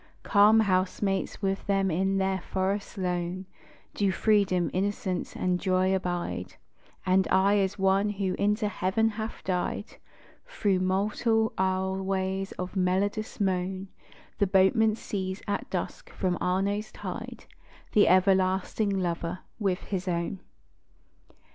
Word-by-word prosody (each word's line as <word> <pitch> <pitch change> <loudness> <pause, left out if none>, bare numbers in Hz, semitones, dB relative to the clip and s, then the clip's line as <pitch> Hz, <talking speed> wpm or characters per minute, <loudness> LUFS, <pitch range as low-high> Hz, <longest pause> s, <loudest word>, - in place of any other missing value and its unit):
Calm 215 +1 +6
housemates 195 0 0
with 195 0 -1
them 195 -2 +2
in 190 +4 +1
their 190 -1 0
forest 195 +3 -2
lone 180 0 -2 0.5
Do 200 -2 +1
Freedom, 190 -3 +2
Innocence 190 -1 -2
and 180 -1 0
Joy, 185 0 +2
abide: 180 -2 -3 0.5
And 185 0 +3
aye 200 +2 +4
as 195 0 0
one 195 +1 +2
who 195 -2 -1
into 210 +1 +1
Heaven 205 +3 +1
hath 220 +1 -6
died 180 -2 -2 0.5
Thro' 205 - 0
mortal 215 +4 +1
aisleways 190 0 -1
of 185 +2 -6
melodious 195 +4 0
moan, 190 0 -1 0.5
The 200 - +3
boatman 205 +4 +4
sees, 190 -3 -4
at 205 - -2
dusk, - - -4
from 185 -2 -1
Arno's 200 +3 0
tide, - - -7 0.5
The 210 - +5
Everlasting 190 +2 +3
Lover 180 -2 -2 0.2
with 195 -3 0
his 185 -2 -4
own! 170 +2 -2
190 Hz, 120 wpm, -28 LUFS, 185-205 Hz, 0.5 s, Calm